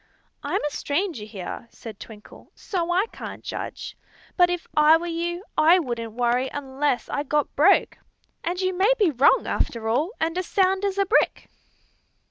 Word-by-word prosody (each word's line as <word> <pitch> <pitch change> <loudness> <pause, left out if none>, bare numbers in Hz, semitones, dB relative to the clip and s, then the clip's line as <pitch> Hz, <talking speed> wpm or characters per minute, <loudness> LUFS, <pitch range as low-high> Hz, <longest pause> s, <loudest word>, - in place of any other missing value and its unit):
"I'm - - -2
a 295 - -1
stranger 295 - -2
here," 205 +2 -7
said 220 -3 -11
Twinkle; 210 -2 -13
"so 350 -3 -3
I 370 +4 +2
can't - - -8
judge. - - -6 0.4
But 355 -1 +5
if 355 -1 -3
I 305 +1 +6
were 340 - -6
you, 345 +1 -3
I 320 +3 +6
wouldn't 235 -8 -4
worry 245 +2 +1
unless 275 -1 -2
I 285 - -2
got 295 0 -1
broke; 350 +8 +3 0.4
and 355 +1 -2
you 370 -1 0
may 390 +6 +3
be 400 -7 +3
wrong, 270 0 +4
after 225 -2 -2
all, 270 +10 +1
and 325 +1 -1
as 370 - -4
sound 385 0 +2
as 395 -1 -1
a 395 - +2
brick!" 425 - +1
320 Hz, 170 wpm, -24 LUFS, 250-360 Hz, 0.4 s, I